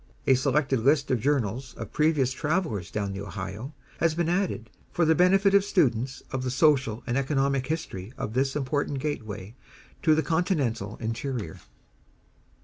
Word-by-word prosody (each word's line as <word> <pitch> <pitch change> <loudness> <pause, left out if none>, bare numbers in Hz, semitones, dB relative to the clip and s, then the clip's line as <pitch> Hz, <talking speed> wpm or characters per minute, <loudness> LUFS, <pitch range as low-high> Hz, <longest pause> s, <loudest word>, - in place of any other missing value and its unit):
A 135 - +5
selected 135 0 +2
list 140 +4 +2
of 125 - +2
Journals 130 -2 -1
of - - -8
previous 150 -4 +2
travelers 155 - -1
down 100 -2 -3
the 100 - -5
Ohio, 100 - -6 0.2
has 165 -1 +2
been 170 -1 0
added, 175 - -1 0.2
for 170 - +2
the 160 - +5
benefit 195 +3 +4
of 200 -1 +6
students 135 - +1
of 130 - -2
the 130 - -2
social 130 -5 +2
and 125 +2 0
economic 135 -1 0
history 120 - -4
of 110 - -4
this 135 +2 +1
important 145 0 -1
gateway 110 -8 -4 0.5
to 155 -3 +4
the 160 - +1
continental 140 - 0
interior. 115 0 -4
135 Hz, 155 wpm, -27 LUFS, 115-155 Hz, 0.5 s, of